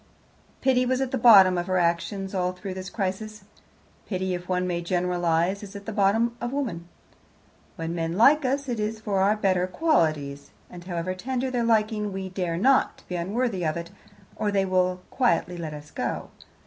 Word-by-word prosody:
Pity 255 -1 +3
was 255 +1 0
at 265 -1 -1
the - - 0
bottom 195 -6 +7
of 175 - -4
her 185 0 +1
actions 180 +3 -1
all 180 -1 0
through 185 +1 -6
this 185 0 -6
crisis. 210 +1 -4 0.6
Pity, 185 -2 -2
if 180 0 -6
one 180 0 +1
may 175 -1 -2
generalize, 175 +1 0
is 205 -1 -10
at 200 0 -8
the 220 - -4
bottom 220 +4 +2
of 240 0 -2
woman. 220 -12 -3 0.9
When 165 0 -4
men 165 0 -2
like 285 +7 +6
us, 275 +2 -1
it 240 -3 -2
is 215 +1 -2
for 205 -3 -1
our 200 +3 +3
better 185 -4 +1
qualities, 155 - 0 0.2
and 175 -1 -10
however 175 0 -3
tender 255 +6 -3
their 245 -1 0
liking, 215 -2 +1
we 190 0 -5
dare 180 -3 -2
not 265 +8 +2
be 180 - -4
unworthy 195 +2 -1
of 155 0 0
it, 170 +1 -6 0.4
or 210 - -1
they 195 -1 +2
will 185 -1 +1
quietly 235 -8 +1
let 165 -3 -5
us 150 0 -11
go. - - -3
190 Hz, 185 wpm, -25 LUFS, 175-220 Hz, 0.9 s, bottom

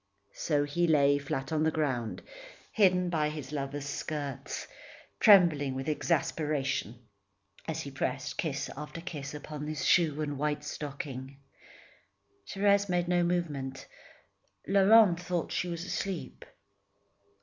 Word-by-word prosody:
So 145 -3 0
he 170 +4 0
lay, 145 -2 +4
flat 135 0 -4
on 155 -1 +1
the 160 - +3
ground, 130 -8 -2 0.5
hidden 180 -4 +3
by 155 -3 +1
his 150 -3 -7
lover's 140 -1 -4
skirts, 145 -2 -4 0.5
trembling 165 -10 +6
with 135 0 -4
exasperation 150 -6 -1 0.7
as 160 0 -2
he 140 - -7
pressed 135 0 -3
kiss 145 -4 -1
after 150 +3 -7
kiss 150 -5 -6
upon 150 0 -6
the 155 - -3
shoe 155 +1 +2
and 145 -2 -4
white 150 0 -1
stocking. 140 -2 -6 1.1
Thérèse 200 0 +2
made 175 -1 +1
no 175 0 +2
movement. 150 -7 -2 0.8
Laurent 195 -1 +6
thought 175 -2 -2
she 180 - -1
was 170 0 -4
asleep. 180 -9 -4
150 Hz, 125 wpm, -30 LUFS, 140-175 Hz, 1.1 s, trembling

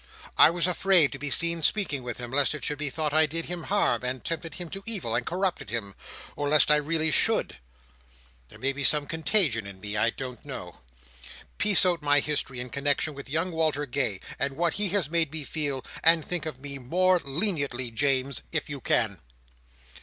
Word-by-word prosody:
I - - +7
was 170 0 0
afraid 180 -3 +4
to 135 - -7
be 145 +1 -2
seen 170 +2 +5
speaking 155 -5 0
with 120 -2 -6
him, 120 -1 -6
lest 140 +2 +1
it 150 - -6
should 150 0 -3
be 150 -1 -2
thought 150 +1 -3
I 155 0 +4
did 165 +2 -4
him 175 -2 -5
harm, 155 - +1
and 125 0 -3
tempted 165 -1 -4
him 175 - -6
to 195 - -6
evil, 220 -4 -2
and - - 0
corrupted 185 +1 -2
him: 100 -4 -4 0.4
or 145 0 -2
lest 150 0 +5
I 150 - +6
really 155 +1 +1
should. - - +1 0.9
There - - -14
may 135 +1 -1
be 140 +1 -5
such 145 +1 +3
contagion 160 - +2
in 100 -1 -10
me; 105 +2 -5
I 110 +2 +2
don't 125 -1 -7
know. - - -8 0.8
Piece 205 -3 +5
out 175 -3 +1
my 145 0 +3
history, 145 -3 -2
in 125 0 -6
connexion 145 +3 -1
with 140 -1 -10
young 165 +5 -1
Walter 155 -3 0
Gay, 120 -7 -2 0.2
and 135 +1 -2
what 170 -1 +1
he 205 -1 -1
has 190 -5 0
made 165 -2 +2
me 160 -1 -4
feel; 140 -3 -2 0.2
and 165 -1 +5
think 175 -3 -3
of 130 -5 -6
me 140 0 -7
more 180 +8 +2
leniently, 140 - -1
James, 135 +2 0
if 155 -2 -3
you 140 -2 -6
can." 105 -9 0
150 Hz, 205 wpm, -26 LUFS, 135-165 Hz, 0.9 s, I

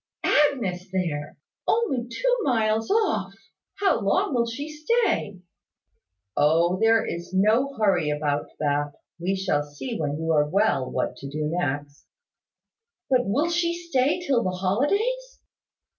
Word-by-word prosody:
"Agnes 205 -11 +1
there! 160 -7 -3 0.3
Only 275 - +1
two - - 0
miles 225 - +1
off! 435 +1 +1 0.4
How 390 - +2
long 200 +6 +1
will 235 -2 +1
she 270 +6 -5
stay?" 310 - 0 0.9
"O, 170 +5 +3
there 225 0 +4
is 170 +2 -5
no 225 +8 +3
hurry 190 -8 +2
about 150 -1 -1
that. 145 -1 0 0.3
We 185 +3 0
shall 190 -6 0
see 145 - -6
when 145 -2 -1
you 160 +1 -1
are 150 -1 +3
well 175 -8 +1
what - - -2
to 140 - -8
do 150 +2 -3
next." 145 -4 -3 1.0
"But 250 -1 +3
will 290 +12 +1
she 340 0 +1
stay 310 -3 0
till 260 -6 +2
the 185 - 0
holidays?" 400 - -1
205 Hz, 135 wpm, -25 LUFS, -, 1.0 s, there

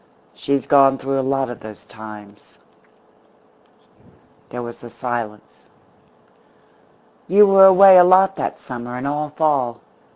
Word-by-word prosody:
She's 140 -1 -3
gone 135 -1 +3
through 135 0 -4
a - - 0
lot 135 0 -2
of 120 - -11
those 105 -3 -13
times." 105 -2 -15 1.9
There 120 0 -8
was 120 0 -11
a 120 - -11
silence. 115 -4 -8 1.6
"You 205 +4 +4
were 195 -1 +5
away 190 0 +6
a - - +7
lot 190 +2 +3
that - - -5
summer, 120 -1 -9
and 125 - -7
all 150 +1 -4
fall. 140 -6 -2
135 Hz, 130 wpm, -18 LUFS, 120-160 Hz, 1.9 s, a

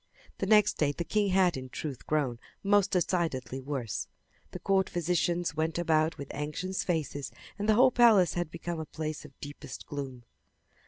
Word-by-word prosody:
The 195 - -1
next 210 0 +5
day 150 -2 +3
the 170 - -4
king 210 +3 +1
had 185 -2 +3
in 130 -1 -6
truth 135 +1 -6
grown 140 -6 0 0.2
most 200 0 +4
decidedly 160 -9 0
worse. 130 -5 -3 0.4
The - - -6
court 195 -1 +1
physicians 175 -1 0
went 160 +1 0
about 160 -2 +2
with 140 - -7
anxious 155 +6 -3
faces 150 -5 -2 0.3
and 205 +2 -1
the 215 - +6
whole 255 +3 +6
palace 225 -7 +5
had 175 -2 -2
become 170 0 -5
a 160 - -4
place 155 -1 -5
of 140 -2 -15
deepest 145 0 -8
gloom. 135 -4 -6
165 Hz, 170 wpm, -30 LUFS, 145-185 Hz, 0.4 s, the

